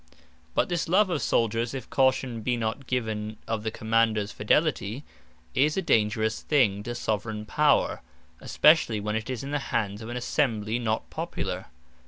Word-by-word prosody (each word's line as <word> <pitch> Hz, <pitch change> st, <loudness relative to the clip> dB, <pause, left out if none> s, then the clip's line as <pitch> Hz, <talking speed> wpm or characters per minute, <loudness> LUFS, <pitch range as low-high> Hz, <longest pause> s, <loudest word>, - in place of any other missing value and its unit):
But -, -, +2 dB
this 175 Hz, -3 st, -2 dB
love 190 Hz, +2 st, +4 dB
of 160 Hz, -, 0 dB
Souldiers, 115 Hz, +2 st, 0 dB
(if 130 Hz, -, -6 dB
caution 130 Hz, -3 st, +1 dB
be 120 Hz, +2 st, 0 dB
not 115 Hz, +3 st, -3 dB
given 110 Hz, -3 st, -2 dB
of 115 Hz, -1 st, -1 dB
the 110 Hz, -, -2 dB
Commanders 110 Hz, -1 st, +1 dB
fidelity,) 125 Hz, -, 0 dB, 0.5 s
is 150 Hz, +5 st, +2 dB
a -, -, +2 dB
dangerous 110 Hz, -4 st, +1 dB
thing 115 Hz, -10 st, +2 dB
to 120 Hz, +3 st, -5 dB
Soveraign 110 Hz, -1 st, -2 dB
Power; 150 Hz, +6 st, +2 dB, 0.4 s
especially 150 Hz, -8 st, +4 dB
when 105 Hz, +1 st, -2 dB
it 110 Hz, +2 st, -3 dB
is 130 Hz, -2 st, -3 dB
in 140 Hz, -, -5 dB
the 145 Hz, -, 0 dB
hands 105 Hz, 0 st, -1 dB
of 110 Hz, -, -7 dB
an 120 Hz, -, -4 dB
Assembly 115 Hz, -4 st, 0 dB
not 110 Hz, -2 st, -1 dB
popular. -, -, -4 dB
115 Hz, 165 wpm, -27 LUFS, 110-135 Hz, 0.5 s, love